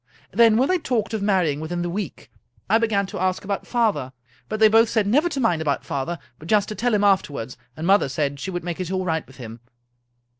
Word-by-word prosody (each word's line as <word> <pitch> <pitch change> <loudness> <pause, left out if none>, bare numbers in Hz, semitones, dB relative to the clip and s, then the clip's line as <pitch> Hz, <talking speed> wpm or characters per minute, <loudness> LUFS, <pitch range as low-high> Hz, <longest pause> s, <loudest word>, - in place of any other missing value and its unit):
Then, 225 +1 +5
when 260 +3 +3
they 370 +1 +1
talked 230 -8 -2
of 220 - -2
marrying 185 -8 +1
within 175 +3 -3
the - - -2
week, 205 +3 -6 0.4
I 225 - +4
began 215 -3 +1
to 190 - -7
ask 185 0 0
about 200 0 -4
father; 205 - 0 0.4
but 215 - -3
they 220 - +7
both 225 +1 +4
said 220 -3 +1
never 290 +12 +2
to 285 - -3
mind 200 -10 +1
about 145 -3 -1
father, 140 +5 -3 0.2
but 155 - -11
just 210 0 +3
to 215 - -5
tell 240 0 +1
him 205 - +1
after 195 -6 +3
wards 125 -2 -6 0.2
and 160 - -4
mother 195 -5 +4
said 140 +1 -2
she 185 - -4
would 175 -2 -4
make 175 0 -4
it 180 -2 -3
all 185 -1 -1
right 160 -3 -1
with 130 - -16
him. 115 -3 -9
195 Hz, 240 wpm, -23 LUFS, 160-220 Hz, 0.4 s, they